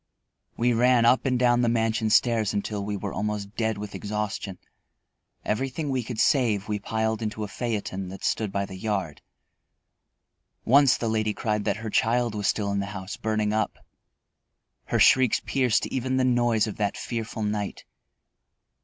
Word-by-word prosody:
We 120 Hz, +1 st, +2 dB
ran 120 Hz, 0 st, +4 dB
up 125 Hz, +3 st, +4 dB
and 125 Hz, -1 st, +2 dB
down 120 Hz, -1 st, +3 dB
the 120 Hz, -, +2 dB
mansion 115 Hz, -1 st, +1 dB
stairs 110 Hz, -2 st, +3 dB
until 100 Hz, 0 st, -2 dB
we 105 Hz, 0 st, -3 dB
were 100 Hz, 0 st, -5 dB
almost 105 Hz, 0 st, -3 dB
dead 110 Hz, -2 st, -1 dB
with 105 Hz, 0 st, -7 dB
exhaustion. 105 Hz, -2 st, -4 dB, 0.9 s
Everything 135 Hz, +6 st, -2 dB
we 130 Hz, -1 st, 0 dB
could 115 Hz, 0 st, -6 dB
save 110 Hz, -7 st, +2 dB
we 105 Hz, -1 st, -2 dB
piled 110 Hz, +1 st, -1 dB
into 110 Hz, -1 st, -3 dB
a -, -, -3 dB
phaeton 100 Hz, -4 st, -4 dB
that 95 Hz, -, -9 dB
stood 110 Hz, -3 st, 0 dB
by 100 Hz, 0 st, -1 dB
the 95 Hz, -1 st, -9 dB
yard. 95 Hz, -7 st, -3 dB, 1.4 s
Once 140 Hz, +1 st, +5 dB
the 115 Hz, -, -2 dB
lady 110 Hz, -1 st, 0 dB
cried 105 Hz, -2 st, -1 dB
that -, -, 0 dB
her 110 Hz, -, -3 dB
child 120 Hz, +1 st, +1 dB
was 105 Hz, -2 st, -2 dB
still 100 Hz, -2 st, 0 dB
in 100 Hz, -, 0 dB
the 100 Hz, -, -2 dB
house, 95 Hz, +1 st, -6 dB
burning 110 Hz, -1 st, -1 dB
up. 110 Hz, -1 st, -1 dB, 1.1 s
Her -, -, 0 dB
shrieks 130 Hz, -3 st, +5 dB
pierced 130 Hz, -5 st, +1 dB
even 130 Hz, 0 st, -2 dB
the 130 Hz, -, +2 dB
noise 120 Hz, -3 st, +2 dB
of 110 Hz, -, -6 dB
that 105 Hz, -1 st, -1 dB
fearful 115 Hz, -2 st, -4 dB
night. 105 Hz, -1 st, -3 dB
110 Hz, 170 wpm, -26 LUFS, 105-120 Hz, 1.4 s, Once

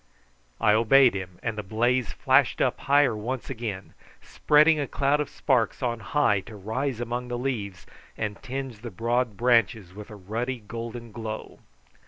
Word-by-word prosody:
I 105 Hz, -1 st, +4 dB
obeyed 120 Hz, +4 st, +5 dB
him, 90 Hz, -2 st, -6 dB
and 115 Hz, -2 st, -2 dB
the -, -, -1 dB
blaze 120 Hz, +4 st, 0 dB
flashed 135 Hz, -2 st, +2 dB
up 125 Hz, -, +1 dB
higher 140 Hz, -3 st, +3 dB
once 120 Hz, +5 st, -4 dB
again, 110 Hz, -6 st, -5 dB, 0.3 s
spreading 150 Hz, +1 st, +3 dB
a 140 Hz, -, -1 dB
cloud 140 Hz, +3 st, +1 dB
of 150 Hz, -, -4 dB
sparks 130 Hz, -1 st, 0 dB
on 120 Hz, -2 st, -1 dB
high 110 Hz, -1 st, +2 dB
to 110 Hz, -, -9 dB
rise 115 Hz, +5 st, -3 dB
among 120 Hz, +1 st, -3 dB
the 120 Hz, 0 st, -3 dB
leaves 110 Hz, -8 st, -4 dB, 0.3 s
and 105 Hz, -2 st, -4 dB
tinge 135 Hz, -3 st, -5 dB
the 120 Hz, +2 st, -7 dB
broad 115 Hz, +2 st, -1 dB
branches 115 Hz, -5 st, +2 dB
with 105 Hz, +1 st, -10 dB
a 105 Hz, -, -9 dB
ruddy 115 Hz, +7 st, -3 dB
golden 115 Hz, +1 st, -7 dB
glow. 110 Hz, -1 st, -7 dB
120 Hz, 165 wpm, -26 LUFS, 105-130 Hz, 0.3 s, obeyed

